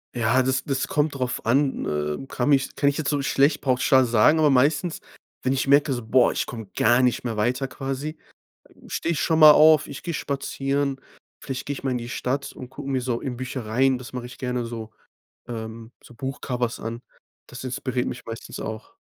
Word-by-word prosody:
Ja, 120 +3 +2
das 130 0 0
das 135 -2 -1
kommt 150 -1 0
drauf 130 -1 -3
an, 135 +4 +1
äh, 75 - -2
kann 125 +1 -1
mich 140 -1 +2
kann 140 - +1
ich 140 - +2
jetzt 150 - -1
so 145 -2 0
schlecht 140 +2 +2
pauschal 130 0 +3
sagen, 120 +7 +4
aber 150 -2 +4
meistens, 150 +6 +2 0.4
wenn 130 - +1
ich 135 0 -1
merke 140 +1 +4
so: 120 -3 -3
„Boah, 125 +2 +4
ich - - -1
komme 110 -4 -8
gar 120 +2 +4
nicht 125 -1 +1
mehr 115 -3 -3
weiter 125 +5 0
quasi“, 135 +4 -4 0.7
stehe 170 - -1
ich 155 - -2
schon 160 -1 +2
mal 155 -1 +10
auf. 155 -1 +6
Ich 140 - -8
gehe 170 -3 -4
spazieren. 140 0 -2 0.4
Vielleicht 135 -2 -5
gehe 145 - -2
ich 135 - -10
mal 130 - 0
in 125 - -1
die 120 0 -7
Stadt 135 +3 -3
und 125 0 -9
gucke 135 +1 -8
mir 130 -1 +1
so 120 -2 -2
in 125 -3 -4
Büchereien, 130 +1 0
das 125 -2 -10
mache 125 -1 -5
ich 125 - -11
gerne 125 -2 -2
so, 115 -2 -7 0.6
ähm 115 0 -7
so 120 - -15
Buchcovers 125 -1 -3
an. 115 +2 -5 0.5
Das 125 - -9
inspiriert 125 0 -2
mich 125 - -6
meistens 115 0 -7
auch. 110 0 -7
130 Hz, 205 wpm, -24 LUFS, 120-140 Hz, 0.7 s, mal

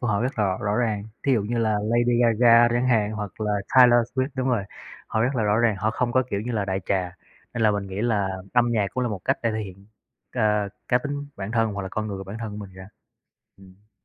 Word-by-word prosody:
của 120 - -2
họ 105 -1 +1
rất 130 0 -3
là 105 - +3
rõ 95 -1 -1
rõ 100 +1 0
ràng. 110 -4 0 0.2
Thí 135 - +4
dụ 110 -5 +2
như 120 +3 -2
là 110 -2 +1
Lady 120 +2 +2
Gaga 115 0 +5
chẳng 120 +2 0
hạn 110 -4 +2
hoặc 105 -1 -6
là 105 -1 0 0.2
Taylor 125 -2 +7
Swift 130 +1 0
đúng 130 0 -1
rồi, 120 -5 +1 0.4
họ 110 - -1
rất 130 +3 0
là 115 - 0
rõ 105 +1 +2
ràng, 115 -3 +2
họ 105 +3 0
không 120 +1 -1
có 130 - +3
kiểu 100 - -1
như 120 +3 -4
là 105 -3 0
đại 95 0 -2
trà. 90 -3 -1 0.4
Nên 120 - -1
là 110 - +5
mình 100 -1 -2
nghĩ 95 +1 -5
là 105 -4 +1 0.2
âm 120 -1 +3
nhạc 105 -3 +1
cũng 125 - -1
là 125 - 0
một 100 -4 -4
cách - - +1
để 115 - +1
thể 110 - -2
hiện, 95 -1 -9 0.5
ờ, 105 -3 +1 0.2
cá 125 - +4
tính 145 +1 -5
bản 100 +1 -5
thân 115 -2 +1
hoặc 100 0 -4
là 95 - -5
con 110 +3 -3
người 100 -2 -5
của 95 - -7
bản 100 +3 -7
thân 115 -2 -4
của 105 - -8
mình 95 - -17
ra, 95 0 -11 0.7
ừm. 95 +2 -19
110 Hz, 275 wpm, -24 LUFS, 100-120 Hz, 0.7 s, Taylor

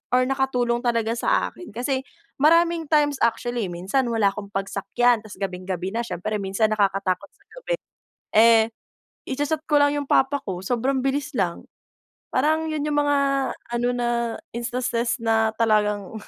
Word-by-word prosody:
or 255 - +4
nakatulong 255 -3 0
talaga 230 -2 +1
sa - - +1
akin 355 -7 -12
kasi 260 +3 -1 0.4
maraming 335 +2 +4
times 295 -2 +3
actually 235 -1 0
eh, - - -7
minsan 195 +10 -1
wala 225 -4 +2
akong 200 0 -7
pagsakyan 200 +5 +1
tapos 215 -1 -11
gabing-gabi 185 -1 -3
na 230 - -2
siyempre 210 +1 -3
minsan 200 +3 0
nakakatakot 195 -2 0
sa - - -30 0.2
gabi, - - -1 0.6
eh 225 0 +6 0.6
icha-chat 290 +3 -1
ko 295 -2 +4
lang 285 0 +3
yung 290 -1 -3
papa 275 +2 +3
ko 185 -2 -4
sobrang 255 +5 0
bilis 280 +2 -1
lang, 180 -4 -1 0.7
parang 310 +4 +1
yun 305 -2 -2
yung 295 -1 +1
mga 290 0 +2 0.6
ano 240 +1 +1
na 240 -1 -1 0.5
instances 240 0 -1
na 220 -1 +2
talagang 210 -3 +1
235 Hz, 150 wpm, -23 LUFS, 210-275 Hz, 0.7 s, eh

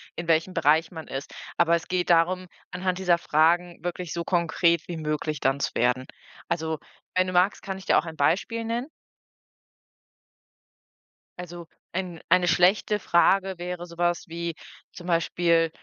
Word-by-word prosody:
in 170 0 -6
welchem 165 +3 +2
Bereich 160 +1 +3
man 160 -2 -8
ist. 135 +2 -6 0.2
Aber 170 0 +4
es 170 - -4
geht 180 -1 -1
darum, 180 +2 +3 0.2
anhand 180 0 -2
dieser 180 -2 +3
Fragen 170 +3 +1
wirklich 175 -1 -4
so 170 0 -3
konkret 170 -1 +1
wie 175 - -5
möglich 150 -1 -2
dann 135 +1 +1
zu - - -1
werden. 125 +2 +1 0.4
Also, 160 -2 -2 0.4
wenn 185 0 +3
du 185 - -3
magst, 180 +3 +3
kann 195 -1 -4
ich 190 - -12
dir - - +4
auch 165 - +1
ein 160 - -7
Beispiel 200 +10 +1
nennen. 235 +3 -2 2.5
Also, 175 -1 -8 0.2
ein 180 -2 -4
eine 180 +1 +4
schlechte 185 +4 +3
Frage 190 +1 +2
wäre 175 0 -5
so 170 -1 -13
was 175 +2 0
wie 170 0 -4 0.4
zum 175 - -11
Beispiel 170 -1 +2
170 Hz, 160 wpm, -26 LUFS, 165-180 Hz, 2.5 s, Aber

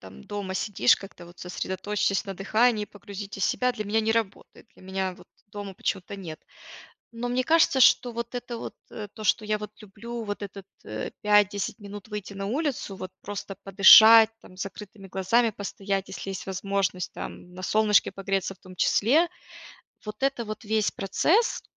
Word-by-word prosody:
там 95 0 -13
дома 205 -2 -5
сидишь 190 - +3
как-то 190 -3 -12
вот: 175 0 -16
"Сосредоточьтесь 195 +3 -2
на 195 -2 -6
дыхании, 215 +3 +2
погрузитесь 200 -1 -6
в - - +4
себя." 250 0 +1
Для 215 -3 -5
меня 215 +2 +1
не 220 0 0
работает. 225 -1 -3
Для - - -19
меня 190 -1 -2
вот 180 - -18 0.2
дома 205 -1 -8
почему-то 190 +1 -3
нет. 165 -5 -8 0.7
Но 240 +1 -4
мне 255 +1 0
кажется, 320 -4 +4
что 245 0 +5
вот 235 +1 -5
это 245 -1 -5
вот, - - -7 0.2
э, 210 -2 -6
то, 215 - -9
что 215 +1 +2
я 215 0 0
вот 210 0 -8
люблю, 225 +3 -7
вот 205 0 -5
этот, 195 -1 -9 0.2
э, 110 0 -5
5-10 205 -1 +2
минут 205 +1 -10
выйти 205 -1 -6
на 195 0 -5
улицу, 255 -5 -2
вот 185 0 -7
просто 200 -1 -6
подышать 220 +3 +9
там, 185 - -16
с - - -2
закрытыми 195 0 -10
глазами 220 +5 +2
постоять, 195 -1 -4
если 195 - -6
есть 190 - -6
возможность, 195 -1 -2
там 180 - -8
на 185 - -9
солнышке 210 +2 +3
погреться 195 0 -2
в 190 - -24
том 185 0 -14
числе, 295 - +3 0.8
вот 210 +4 -8
это 270 -3 0
вот 215 +1 -7
весь 215 0 +1
процесс- 325 - +1
205 Hz, 180 wpm, -26 LUFS, 195-220 Hz, 0.8 s, подышать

